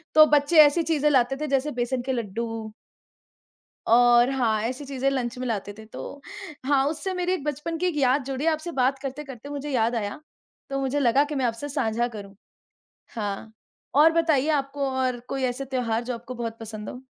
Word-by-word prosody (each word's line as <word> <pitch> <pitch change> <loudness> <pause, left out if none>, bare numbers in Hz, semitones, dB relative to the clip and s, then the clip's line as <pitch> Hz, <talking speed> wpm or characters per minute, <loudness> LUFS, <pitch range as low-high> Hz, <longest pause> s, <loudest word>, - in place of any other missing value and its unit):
तो 310 0 +10
बच्चे 295 +2 +3
ऐसी 325 +3 +2
चीज़ें 300 -2 +2
लाते 265 -1 +3
थे 305 - -1
जैसे 275 +2 0
बेसन 245 +1 -1
के 265 +2 -3
लड्डू। 225 0 -4 1.2
और 240 +1 +6
हाँ, 230 -5 +1
ऐसी 255 +5 -3
चीज़ें 270 0 -1
लंच 250 -2 -2
में 255 0 -3
लाते 205 -2 -3
थे 220 - -11
तो 280 +5 -9 0.4
हाँ 275 -1 +3
उससे 325 +5 -3
मेरी 360 0 -1
एक 300 - -3
बचपन 300 +3 -3
की 360 +1 0
याद 265 +1 +3
जुड़ी 270 +2 -3
आपसे 325 +1 0
बात 265 -1 +1
करते-करते 270 -1 -7
मुझे 290 0 -5
याद 235 -2 +1
आया, 205 +3 -3 0.5
तो 275 0 -2
मुझे 270 +2 0
लगा 270 +2 +4
कि 295 0 -5
मैं 260 -2 0
आपसे 235 +5 -2
सांझा 240 -4 0
करूँ 205 -4 -10 0.8
हाँ, 210 0 -4 0.4
और 315 +3 +6
बताइए 315 -4 +2
आपको 275 -1 -1
और 255 -2 -1
कोई 270 -1 -3
ऐसे 255 +2 -2
त्योहार 245 -3 -1
जो 250 0 -3
आपको 240 +2 -8
बहुत 230 -1 -5
पसंद 215 -1 -7
हो। 250 - -8
265 Hz, 190 wpm, -25 LUFS, 235-290 Hz, 1.2 s, तो